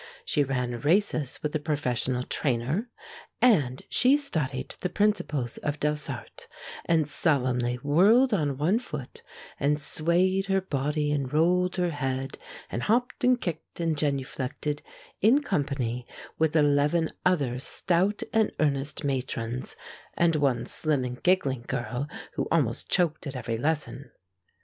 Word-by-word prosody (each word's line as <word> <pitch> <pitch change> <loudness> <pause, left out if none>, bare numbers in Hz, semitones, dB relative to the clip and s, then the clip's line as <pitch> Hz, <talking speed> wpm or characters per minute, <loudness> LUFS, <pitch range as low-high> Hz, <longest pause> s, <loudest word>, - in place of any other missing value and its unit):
She 145 - +2
ran 125 -3 -2
races 155 - +1
with 150 0 -2
a - - +2
professional 130 -4 -1
trainer, 140 - -1 0.5
and 145 - +3
she 260 +3 +4
studied 150 - -3
the 180 - -2
principles 180 - 0
of 145 0 -3
Delsarte, 150 -4 -3 0.4
and 160 -3 +2
solemnly 125 -6 +1
whirled 210 - +5
on 145 -8 0
one 175 +10 +2
foot 150 - -8 0.4
and 150 +1 +2
swayed 180 +6 +1
her 195 -1 +2
body 150 -3 -1
and 140 -3 -1
rolled 180 +4 +2
her 180 -1 0
head 135 -2 -3 0.3
and 120 - -2
hopped 245 - 0
and 250 0 +4
kicked 170 -4 -5
and 165 -2 +1
genuflected 140 0 -2 0.4
in 255 +8 +5
company 135 - -2 0.3
with 160 0 +2
eleven 150 +2 +3
other 140 -9 +1
stout 185 +8 +1
and 220 -1 +3
earnest 140 0 0
matrons 125 -3 -2 0.4
and 170 -1 +3
one 135 -5 +1
slim 150 0 0
and 125 0 -5
giggling 140 -10 +2
girl 120 +4 -3 0.3
who - - -2
almost 135 -9 +1
choked 165 -4 +1
at 135 - -6
every 115 -2 -3
lesson. 145 -2 -2
150 Hz, 135 wpm, -27 LUFS, 130-175 Hz, 0.5 s, whirled